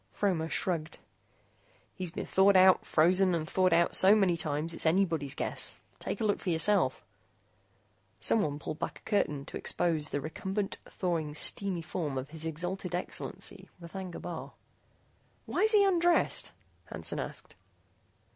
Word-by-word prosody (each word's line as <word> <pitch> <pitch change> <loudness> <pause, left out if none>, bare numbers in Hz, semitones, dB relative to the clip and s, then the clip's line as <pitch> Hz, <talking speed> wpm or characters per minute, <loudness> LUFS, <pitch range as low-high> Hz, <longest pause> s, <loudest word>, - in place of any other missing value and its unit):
Fromer 175 -6 -1
shrugged. 165 -3 -2 1.0
"He's 185 -2 -5
been 165 - -5
thawed 195 +1 +4
out, 185 0 +6
frozen, 180 +3 +3
and 155 -1 -3
thawed 185 +1 +2
out 170 +1 +3
so 195 +3 +7
many 190 -5 +3
times, 160 0 -2
it's 165 - -1
anybody's 160 -5 +1
guess. - - 0 0.2
Take - - -4
a - - -2
look 205 -2 +1
for - - -4
yourself." 175 +5 +1 1.1
Someone 155 -10 +1
pulled 155 +1 -6
back - - -4
a - - -17
curtain 150 -9 0
to - - -6
expose 160 -3 0
the 145 - -2
recumbent, 190 +7 -3
thawing, 165 -5 -2
steamy 185 +1 +1
form 155 -5 -3
of 135 +3 -5
His 160 0 -7
Exhalted 175 +3 -3
Excellency 180 - -4
R'thagna 180 +1 -7
Bar. - - -7 0.9
"Why's 435 +1 +3
he 410 -2 +6
undressed?" 350 -2 +2 0.3
Hansen - - -4
asked. - - -6
175 Hz, 145 wpm, -30 LUFS, 160-195 Hz, 1.1 s, so